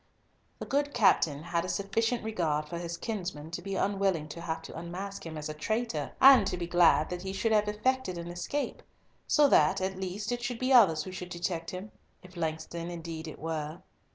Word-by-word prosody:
The - - -6
good 285 0 0
captain 160 -9 +3
had 170 0 -1
a - - -4
sufficient 225 +4 0
regard 160 -9 -1
for 170 +2 -5
his 170 0 -4
kinsman 180 -9 -5
to 170 - -4
be 195 +1 -4
unwilling 195 -6 0
to 170 - -7
have 165 -1 -4
to - - -9
unmask 180 +4 -6
him 160 -1 -6
as 150 - -4
a 155 - -4
traitor, 190 - -2
and 260 -7 +8
to 180 - -2
be 175 - -3
glad 175 -2 +4
that 180 0 -4
he 190 +1 -4
should 220 +4 0
have 210 -1 +3
effected 210 -2 0
an 170 0 -6
escape, 175 +12 -3 0.5
so 295 -2 +5
that, 150 - +4
at 190 0 -2
least, 195 +4 -3
it 245 0 -2
should 240 0 -3
be 255 +2 +1
others 185 -11 +6
who 185 - -7
should 180 -1 -7
detect 170 -1 -3
him—if 185 -1 -11
Langston 165 +1 -3
indeed 165 -2 -6
it 155 - -8
were. 160 0 -4
180 Hz, 205 wpm, -30 LUFS, 165-210 Hz, 0.5 s, and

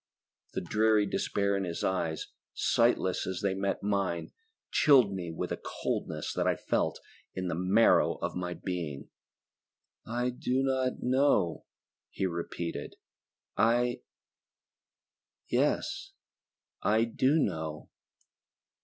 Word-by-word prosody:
The - - -2
dreary 105 +3 +3
despair 100 0 0
in 100 - -1
his 85 -2 -4
eyes, 85 -4 -1 0.3
sightless 95 -1 +2
as 95 -1 -3
they 100 -1 +1
met 95 0 -2
mine, 100 -4 -1 0.4
chilled 130 -9 +5
me 90 -3 -4
with 80 - -4
a - - -3
coldness - - -3
that - - 0
I - - +3
felt - - -1 0.4
in 95 -1 -2
the - - -1
marrow 95 +7 +4
of - - -4
my 90 -1 -3
being. 85 -7 -5 0.9
"I 120 +2 -1
do 125 +1 0
not 130 -1 0
know," 125 - +2 0.4
he - - -2
repeated. 85 -1 -4 0.6
"I... 120 +2 +2 1.5
Yes, 390 0 0 0.7
I 110 +2 +3
do 130 +6 +2
know!" 80 - -2
100 Hz, 115 wpm, -30 LUFS, 90-120 Hz, 1.5 s, chilled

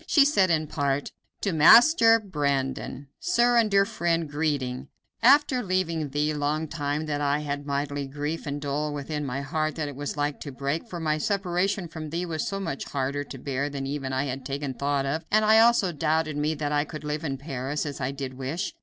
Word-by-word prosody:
She 285 -3 +5
said 200 -11 +3
in 155 -2 +2
part: 140 -1 -1 0.3
"To 200 - 0
Master 225 - +7
Brandon: 140 - -2
"Sir 245 -9 +2
and 225 -2 +4
Dear 195 -1 +4
Friend, 170 -3 -1
Greeting 145 -3 -2 0.3
After 270 0 +5
leaving 180 -6 -1
thee, 150 +2 0
long 150 +2 -1
time 145 0 -2
had 145 -1 -2
I 145 +1 +1
that 145 0 -4
mighty 140 0 -2
grief 150 +3 -4
and 145 0 -3
dole 145 +1 -2
within 150 +1 -4
my 135 0 -3
heart 155 +2 -2
that 155 -2 -2
it 145 - -7
was 145 +1 -5
like 145 0 -1
to 145 - -7
break; 140 - -3
for 175 - -5
my 155 -1 0
separation 190 0 0
from 160 -1 -7
thee 170 +3 -2
was 160 -3 -3
so 195 - -3
much 140 -8 -4
harder 140 +1 -2
to 135 - -9
bear 135 +1 -2
even 140 0 -4
than 130 -1 -4
I 130 +1 0
had 135 -1 -4
taken 140 +1 -3
thought 140 +1 -1
of, 155 +4 -2
and 215 +1 +3
I 220 +1 +6
also 225 -5 +4
doubted 155 0 0
me 150 +2 0
that 145 -1 -3
I 145 0 +2
could 155 0 -8
live 150 +1 -3
in 135 -4 -2
Paris, 140 +1 -3
as 145 -1 -5
I 130 - 0
did 135 -1 -5
wish. 135 +7 -4
150 Hz, 210 wpm, -26 LUFS, 140-170 Hz, 0.3 s, Master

